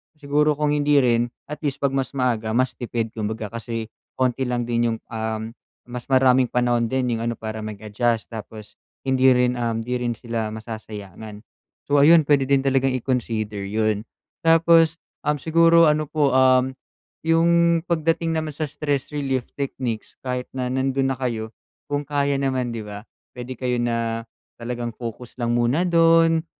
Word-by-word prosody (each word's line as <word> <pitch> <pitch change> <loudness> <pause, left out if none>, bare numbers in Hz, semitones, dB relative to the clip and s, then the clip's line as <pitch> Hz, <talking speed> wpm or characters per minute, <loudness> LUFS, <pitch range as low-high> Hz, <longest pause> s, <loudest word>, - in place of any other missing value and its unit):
siguro 150 0 +1
kung 150 0 0
hindi 145 0 +2
rin 120 -1 +2 0.2
at 150 - -5
least 140 -2 -3
'pag 140 - +3
mas 135 0 -2
maaga, 115 -4 0
mas 130 +1 +2
tipid 115 -2 -3
kumbaga 110 -1 -4
kasi 115 -1 -5 0.2
konti 130 0 0
lang 120 -1 -1
din 120 -1 0
yung, - - -8
um, 110 0 -3 0.3
mas 120 -1 -8
maraming 130 -1 +4
panahon 120 -1 +1
din 130 0 0
yung 115 - -2
ano, 115 - -1
para 110 0 -6
mag-adjust 110 +2 -2
tapos 110 -1 -9 0.2
hindi 130 -1 +3
rin, 125 0 +1
um, 115 -1 -1
hindi 125 +1 -2
rin 120 -1 -1
sila 115 -1 -3
masasayangan. 110 -1 -9 0.4
So, 145 0 +3
ayun 160 +2 +7
pwede 140 -2 +2
din 135 -1 +3
talagang 135 -1 +2
i-consider 110 -5 -2
'yun. 110 +1 -1 0.4
Tapos, 165 0 +5 0.3
um, 150 - +3
siguro 165 +2 +5
ano 150 0 -1
po, 150 -2 +1
um, 130 0 +4 0.5
yung 170 0 +4
pagdating 165 0 +1
naman 155 -1 -3
sa 150 0 -3
stress 145 -1 -2
relief 135 -4 -2
techniques, 130 -5 -4
kahit 125 -1 -3
na 130 -1 -2
nandun 135 +1 0
na 130 - -2
kayo 115 -4 -3 0.4
kung 145 0 -1
kaya 140 -1 0
naman 130 -2 -1
'di 115 -2 -5
ba, 105 0 -7 0.3
puwede 125 0 -7
kayo 125 -1 -1
na 115 -1 -1 0.4
talagang 120 -1 -4
focus 120 +1 -8
lang 120 0 +1
muna 120 +7 +2
dun 165 -1 +4
125 Hz, 160 wpm, -23 LUFS, 115-145 Hz, 0.5 s, ayun